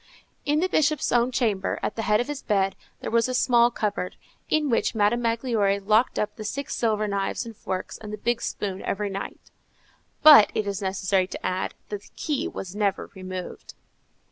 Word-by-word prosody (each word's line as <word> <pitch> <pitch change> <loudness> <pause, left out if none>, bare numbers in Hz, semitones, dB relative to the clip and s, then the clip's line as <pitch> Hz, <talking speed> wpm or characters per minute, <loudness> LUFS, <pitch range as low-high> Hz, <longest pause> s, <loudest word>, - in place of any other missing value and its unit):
In 295 +2 +2
the 370 - +2
Bishop's 305 -4 +1
own 240 +1 +3
chamber, 215 -6 0
at - - -2
the 225 - -2
head 210 -1 +2
of 245 - -1
his 290 -1 -5
bed, 195 -2 +1 0.3
there - - -4
was 230 +1 +2
a 255 - -1
small 240 -1 +4
cupboard, 210 -5 -3 0.3
in 310 -1 +2
which 235 -2 +1
Madame 215 +3 +2
Magloire 230 -4 +1
locked 215 +5 +2
up 210 0 -1
the 215 - -6
six 275 +6 -4
silver 215 -2 +1
knives 200 +3 -2
and 230 -1 -9
forks 185 -2 -5
and 210 -1 -8
the 210 - -4
big 235 +2 -1
spoon 195 -2 -3
every 205 0 -2
night. 195 +1 -7 0.7
But 295 -9 +10
it 215 - 0
is 200 0 -3
necessary 190 -1 +1
to - - -7
add, 185 +1 -2
that 205 -1 -4
the - - -18
key 300 +2 -2
was 190 - -7
never 205 -2 -1
removed. 185 -1 -7
215 Hz, 195 wpm, -25 LUFS, 195-240 Hz, 0.7 s, But